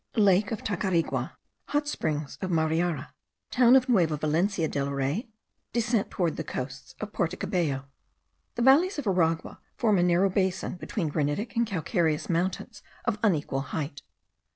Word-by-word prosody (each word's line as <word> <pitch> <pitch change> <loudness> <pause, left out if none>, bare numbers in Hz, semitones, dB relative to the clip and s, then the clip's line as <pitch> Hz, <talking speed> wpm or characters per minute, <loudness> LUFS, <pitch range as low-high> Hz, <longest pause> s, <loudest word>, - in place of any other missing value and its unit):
LAKE 200 -1 +4
OF 220 - -4
TACARIGUA. 185 -4 -1 0.3
HOT 290 0 0
SPRINGS 150 - -3
OF 185 - -2
MARIARA. 160 -2 0 0.4
TOWN 250 0 +6
OF 260 -1 +4
NUEVA 170 -11 +3
VALENCIA 165 +4 +1
DEL 140 -2 -2
REY. 140 - -2 0.4
DESCENT 235 -2 +1
TOWARDS 175 -4 -1
THE 160 - -2
COASTS 130 -1 -6
OF 210 -1 -6
PORTO 175 0 -1
CABELLO. 170 -9 -1 0.7
The - - -2
valleys 315 +9 +5
of 290 - -3
Aragua 165 -4 0 0.2
form 215 -5 +3
a - - +4
narrow 180 +2 +3
basin 190 -1 -1
between 175 -2 -3
granitic 150 - -1
and 235 0 +2
calcareous 170 -4 0
mountains 175 +3 -2 0.2
of 225 -3 0
unequal 150 -9 +1
height. 140 +1 -4
180 Hz, 150 wpm, -27 LUFS, 155-210 Hz, 0.7 s, TOWN